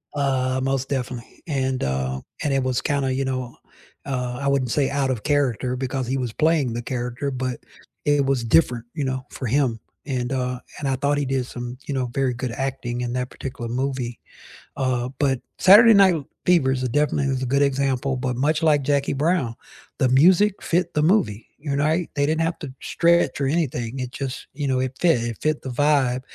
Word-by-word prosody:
uh, 130 -2 +1
most 135 0 -1
definitely 125 -3 -5
and, 130 -4 -1
uh 65 0 -1 0.2
and 145 -2 +1
it 135 - +1
was 130 -1 0
kinda, 140 -2 0
you 135 +1 -1
know, 130 -2 -3 0.5
uh, 125 -3 -3
I 140 - -1
wouldn't 135 -3 +1
say 140 +1 +2
out 140 -2 0
of 120 -5 -3
character 130 -4 +1
because 130 0 -3
he 135 +2 0
was 125 -3 -2
playing 150 -5 +2
the 120 - -3
character 125 +3 -3
but 130 -1 -3 0.5
it 145 -1 +3
was 135 -3 +1
different, 120 -1 +2
you 150 -3 -2
know, 130 0 -2
for 130 - -5
him. 120 -2 +1 0.3
And, 130 -2 -2
uh, 125 -1 -2 0.2
and 145 - -2
I 135 - +1
thought 145 +2 0
he 145 - 0
did 130 -1 -1
some, 120 0 -7
you 145 - -3
know, 130 -2 0
very 135 -2 +1
good 120 0 -4
acting 125 -2 -3
in 120 - -2
that 125 0 -2
particular 120 -3 -6
movie. 125 -1 -3 0.6
Uh, 130 -2 0
but 135 -3 +1 0.2
Saturday 210 +4 +8
Night 195 -2 +6
l 150 -5 -4 0.2
Fever 170 -7 +4
is 130 -1 -1
a 130 - 0
definitely 140 +1 +1
was 130 0 -1
a - - -2
good 140 +3 +2
example, 135 -1 +1
but 125 -1 -2
much 150 +5 +1
like 150 -3 +4
Jackie 140 0 +1
Brown, 140 -4 0 0.4
the 130 -2 +3
music 185 +9 +5
fit 175 -1 -1
the 150 - +2
movie, 160 - +2
you're 140 -1 -3
not 145 +2 +2 0.2
they 145 - +2
didn't 160 +2 0
have 165 +1 0
to 140 -5 -7
stretch 170 -2 +2
or 140 - 0
anything, 135 -5 -1
it 125 -1 -3
just, 135 -1 -5
you 145 -1 -2
know, 130 -1 +1
it 130 0 -3
fit, 165 -9 +3
it 115 -2 -4
fit 155 -1 0
the 130 - -6
vibe, 130 -1 +2
135 Hz, 205 wpm, -23 LUFS, 125-145 Hz, 0.6 s, Saturday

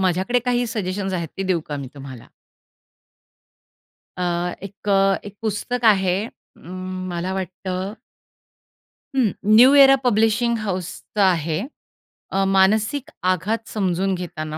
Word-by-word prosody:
माझ्याकडे 190 +6 +1
काही 245 -1 +1
सजेशन्स 195 -3 -3
आहेत 170 -3 -2
ते - - 0
देऊ 185 -3 0
का 145 - -3
मी 140 -2 -6
तुम्हाला? 135 -4 -10 1.9
अ, 175 0 -1
एक 200 +1 -7
अ, 195 0 +3
एक 205 0 -10
पुस्तक 225 +3 -3
आहे. 190 -2 +3
अं, 185 -3 -8
मला 175 +2 -3
वाटतं 190 +1 -4 1.2
हं. 245 -7 +3 0.2
न्यू 255 +5 +8
इरा 270 -1 +8
पब्लिशिंग 230 0 +2
हाउसचं 200 0 -4
आहे 165 -3 +2 0.7
अ, 195 - +2
मानसिक 215 +8 +2 0.2
आघात 210 +6 -2
समजून 190 -2 0
घेताना 155 -3 -6
190 Hz, 120 wpm, -22 LUFS, 180-215 Hz, 1.9 s, न्यू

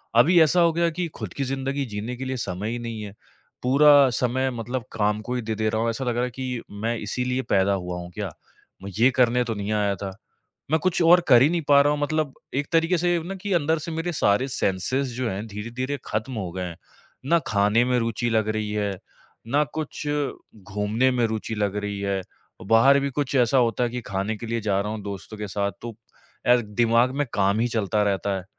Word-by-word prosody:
अभी 165 +9 +6
ऐसा 165 +3 +4
हो 170 -1 +5
गया 170 0 +2
कि 170 +1 -3
खुद - - -6
की 140 - -2
ज़िंदगी 135 +1 -2
जीने 110 +2 -5
के 130 - -5
लिए 130 0 -3
समय 100 -1 -3
ही 120 - -3
नहीं 115 -2 -5
है। 100 -1 -7 0.5
पूरा 140 +1 +6
समय 130 +2 0
मतलब 120 +1 -4
काम 105 -1 0
को 125 - -5
ही 125 - -1
दे 110 0 -3
दे 110 0 0
रहा 110 +1 -1
हूँ। 115 - +1
ऐसा 115 +4 -3
लग 120 -1 -1
रहा 120 - +1
है 125 - -1
कि 130 -2 -4
मैं 110 +3 -2
इसीलिए 125 +5 -2
पैदा 100 0 +3
हुआ 90 -2 -3
हूँ 90 0 -8
क्या? 100 +1 -4 0.5
मैं 100 - -6
ये 125 +3 +6
करने 125 0 +4
तो 115 -2 -3
नहीं 100 +1 -3
आया 100 -2 +1
था। 100 -1 -5 0.6
मैं 160 - +3
कुछ 185 +2 0
और 175 +2 +7
कर 125 -1 +7
ही 145 - +5
नहीं 170 -1 0
पा 140 -1 +7
रहा 145 +1 +4
हूँ, 150 - -2
मतलब 150 -1 0 0.2
एक 145 +2 -1
तरीके 165 +2 +3
से 175 +1 +1
ये 175 - +2
हूँ 165 - -4
ना 195 - -4
कि 205 -2 -2
अंदर 160 -1 +2
से 155 - -6
मेरे 165 +2 -2
सारे 130 -2 +2
सेंसेस 130 +3 -1
जो 125 -2 -1
हैं, 100 +3 -4
धीरे-धीरे 120 +6 -4
खत्म 110 +4 -3
हो 95 -5 -4
गए 95 - -4
हैं। 85 -2 -6 0.5
ना 170 +4 +4
खाने 105 +3 +3
में 125 0 +1
रूचि 115 +1 -1
लग 110 -1 +1
रही 110 -1 -2
है, 100 -3 -2 0.5
ना 145 +6 +2
कुछ 155 -1 -5
घूमने 110 -5 -1
में 125 -2 +1
रूचि 110 0 -3
लग 105 -1 -1
रही 105 -1 -3
है। 100 -1 -1 0.5
बाहर 130 +6 +6
भी 140 0 -1
कुछ 140 0 -2
ऐसा 125 +1 +4
होता 120 0 +2
है 120 - -1
कि 125 - -4
खाने 100 +3 -2
के 115 - -7
लिए 115 +1 -2
जा 100 -2 0
रहा 105 +1 -3
हूँ 110 - -5
दोस्तों 100 +1 -7
के 105 - -4
साथ, 100 +1 -1
तो 120 -1 -6 0.5
ए 125 - +7
दिमाग 115 +3 +2
में 145 -1 0
काम 100 +1 +2
ही 120 - +2
चलता 105 -2 0
रहता 100 -1 0
है। 95 - -6
115 Hz, 235 wpm, -24 LUFS, 105-135 Hz, 0.6 s, और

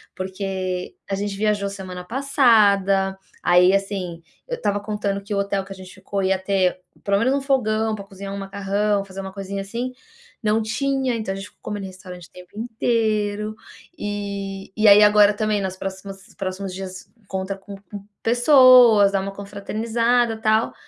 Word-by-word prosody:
porque 185 - -4
a - - -2
gente 200 0 -3
viajou 210 -1 0
semana 185 -2 -7
passada, 200 -6 +3 0.3
aí 180 +1 +5
assim, 195 -4 -2 0.3
eu - - -2
estava 205 - -1
contando 205 -1 -3
que 205 +1 -4
o 200 - +1
hotel 200 0 -1
que 195 - -14
a - - -6
gente 185 -1 -12
ficou 195 +1 -4
ia 190 0 +1
ter 190 -1 0 0.2
pelo 200 -1 +2
menos 260 +5 +2
um 280 - 0
fogão 220 -5 +1
pra 200 - -8
cozinhar 195 0 -8
um 200 - -5
macarrão, 200 +1 -1
fazer 195 0 -8
uma 190 0 -7
coisinha 195 0 -5
assim, 235 +6 -4 0.5
não 215 +1 +2
tinha, 265 +2 -1
então 220 -4 -3
a - - -6
gente 195 +1 -6
ficou - - -26
comendo 205 -2 -5
em - - -6
restaurante 180 -2 -11
o - - -44
tempo 180 +4 -12
inteiro, 215 -3 -1 0.4
e 200 -2 -5
e 215 -1 +3
aí 205 +1 +9
agora 210 0 +6
também 215 -1 0
nos 190 -1 -3
próximos 195 +2 -8
próximos 190 -1 -4
dias 185 0 -7 0.2
encontra 190 0 -4
com 200 +1 -10 0.2
com 205 -1 -7 0.2
pessoas, 245 -4 +7
dá 200 - +1
uma 195 +1 -4
confraternizada 225 +4 0
e 220 - -13
tal, 220 +1 +2
200 Hz, 180 wpm, -22 LUFS, 195-215 Hz, 0.5 s, aí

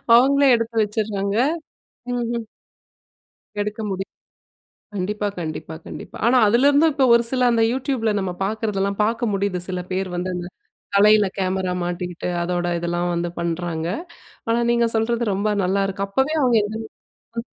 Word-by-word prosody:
அவங்களே 275 +3 +5
எடுத்து 230 -1 0
வச்சறாங்க 210 -1 -1 0.8
ம்ஹ்ம். 235 -1 -2 1.2
எடுக்க 210 +1 -4
முடி 190 0 -2 0.9
கண்டிப்பா, 205 +2 -1
கண்டிப்பா, 160 -1 -5
கண்டிப்பா. - - -9
ஆனா 255 +2 +5
அதிலிருந்து 280 +7 +5
இப்போ 275 -2 +3
ஒரு 235 - +3
சில 255 -1 +3
அந்த 230 -1 +3
youtube 260 -1 -2
ல 215 - +2
நம்ம 190 -2 -2
பார்க்கறதெல்லாம், 200 -1 -1
பார்க்க 230 0 0
முடியுது. 195 -2 0
சில 185 -1 -2
பேர் 185 0 -1
வந்து 180 +1 -2 0.6
தலையில 210 +1 +6
கேமரா 185 -1 0
மாட்டிகிட்டு 175 0 -4 0.2
அதோட 175 0 -1
இதெல்லாம் 175 +1 -1
வந்து 170 0 -1
பண்றாங்க. 170 -1 -2 0.6
ஆனா 230 - +3
நீங்க 235 -1 +3
சொல்றது 230 +1 +1
ரொம்ப 200 +2 0
நல்லாருக்கு. 195 +1 0
அப்பவே 265 +9 +1
அவங்க 245 -4 +4
எ - - -1 0.7
ம். 230 - -2
205 Hz, 135 wpm, -22 LUFS, 185-235 Hz, 1.2 s, தலையில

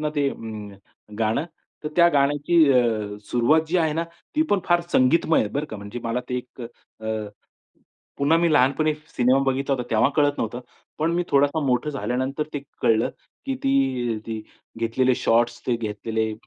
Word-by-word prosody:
ना 150 - 0
ते 140 -1 +2
अं, 110 -2 -7 0.5
गाणं 115 +7 +1 0.4
तर - - -1
त्या 170 0 +7
गाण्याची 145 +2 +1 0.2
अ, 110 -5 +1
सुरुवात 125 +7 +4
जी 180 - +1
आहे 160 -2 +1
ना 165 +2 -1 0.3
ती 310 - +5
पण 205 - +4
फार 175 -1 +3
संगीतमय 160 +5 +4
आहे 105 - -1
बरं 145 +2 -1
का, 110 - -5
म्हणजे 100 +4 -7
मला 115 +2 -1
ते 125 - -2
एक 125 +1 -8 0.4
अ, - - -6 1.1
पुन्हा 145 +4 +3
मी 170 -1 +2
लहानपणी 150 +3 +3 0.2
सिनेमा 125 +2 +4
बघितला 135 +1 0
होता 125 - -5
तेव्हा 110 +4 +4
कळत 145 -1 +4
नव्हतं, 120 +2 -3 0.4
पण 160 +2 +1
मी 175 +1 +1
थोडासा 145 +3 +2
मोठं 130 +4 +1
झाल्यानंतर 130 +3 -2
ते 145 - -2 0.2
कळलं, 115 +1 +3 0.4
की 270 - -1
ती 130 -4 +1
ती 110 -1 -4 0.4
घेतलेले 125 +3 +2
शॉट्स 120 +1 +1 0.2
घेतलेले 110 0 -2
130 Hz, 170 wpm, -23 LUFS, 115-150 Hz, 1.1 s, त्या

